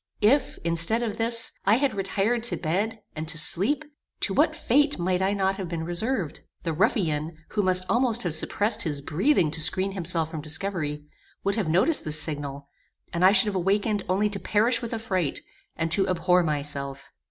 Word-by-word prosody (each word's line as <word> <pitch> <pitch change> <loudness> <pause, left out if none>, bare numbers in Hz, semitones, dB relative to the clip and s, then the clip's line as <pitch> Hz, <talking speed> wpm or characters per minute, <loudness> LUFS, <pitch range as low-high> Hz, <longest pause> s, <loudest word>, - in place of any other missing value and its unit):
If, 260 +6 +2
instead 170 +8 +4
of 220 -2 -4
this, 230 0 +6
I 205 +3 +4
had 270 +2 0
retired 200 +4 -1
to 235 - +2
bed, 200 +7 -3
and 155 +1 -5
to 160 -1 -4
sleep, 205 - +2 0.4
to - - -1
what - - +2
fate 290 +1 +1
might 180 +1 -1
I 195 +1 +1
not 195 -1 -1
have 185 -4 -6
been 165 -1 -4
reserved? 175 - -2 0.2
The 165 - -2
ruffian, 160 - -1
who 210 - -1
must 185 -1 +4
almost 240 -1 +1
have 175 -4 -2
suppressed 205 +7 +1
his 150 -4 -1
breathing 165 - +1
to 160 +1 0
screen 185 +5 +2
himself 165 -4 -1
from 160 - -6
discovery, 155 -2 -3 0.4
would 200 - 0
have 200 -7 -2
noticed 195 - +2
this 155 0 -1
signal, 140 -2 -2 0.5
and 170 +1 -1
I 185 - +7
should 195 0 +5
have 205 -2 -3
awakened 200 +2 0
only 195 +3 +1
to 200 - -4
perish 230 +4 +1
with 235 - -6
affright, 190 - -3 0.3
and 165 0 -3
to 195 +2 +2
abhor 180 0 +2
myself. 140 -3 -4
185 Hz, 185 wpm, -25 LUFS, 160-215 Hz, 0.5 s, I